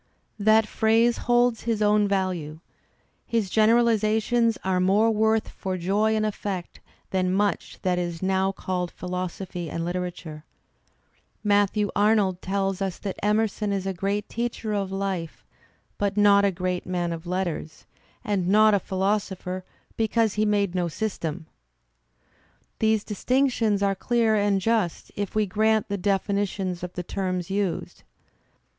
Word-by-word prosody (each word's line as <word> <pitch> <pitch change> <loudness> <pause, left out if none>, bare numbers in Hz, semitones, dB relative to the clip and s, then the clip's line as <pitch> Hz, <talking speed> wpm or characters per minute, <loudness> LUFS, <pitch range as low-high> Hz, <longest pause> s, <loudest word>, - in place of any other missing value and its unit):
That 220 +1 +5
phrase 225 +2 +2
holds 240 -1 +3
his 230 -2 0
own 210 0 +3
value. 180 -6 -2 0.7
His 220 -5 -1
generalizations 225 0 +3
are 185 -1 +1
more 200 +5 +3
worth 220 0 +1
for 185 -1 -4
joy 205 +5 +1
and 215 0 +1
effect 200 -4 -4 0.3
than 185 -1 +1
much 200 +1 -1
that 180 -2 +1
is 175 0 -4
now 190 0 +1
called 180 -2 -3
philosophy 180 -1 -5
and 165 +3 -3
Uterature. 175 -3 -5 1.0
Matthew 205 0 +2
Arnold 205 -3 +2
tells 195 0 -1
us 190 -3 -2
that 195 -2 -5
Emerson 210 0 +1
is 195 -1 -2
a 195 - -1
great 200 +3 -2
teacher 230 -2 -3
of 195 -2 -2
life 195 -4 -4 0.5
but 200 0 -1
not 200 -1 +6
a 200 - +3
great 180 0 -3
man 175 -2 -1
of 165 +1 -8
letters, 175 -3 -3 0.4
and 195 -4 -1
not 215 +2 +5
a 200 - +4
philosopher 190 -1 -2 0.3
because 225 -1 +1
he 215 0 +1
made 205 -3 +1
no 180 -2 0
system. 165 -4 -4 1.3
These 220 -1 +2
distinctions 230 -2 +1
are 200 0 +2
clear 230 +2 +1
and 205 -1 +2
just 215 -4 -1
if 205 0 -4
we 215 -1 +3
grant 215 +2 +1
the 200 - -1
definitions 195 -1 -1
of 180 0 -6
the 180 - -4
terms 185 -1 -3
used. 195 -2 -2
200 Hz, 140 wpm, -25 LUFS, 185-215 Hz, 1.3 s, not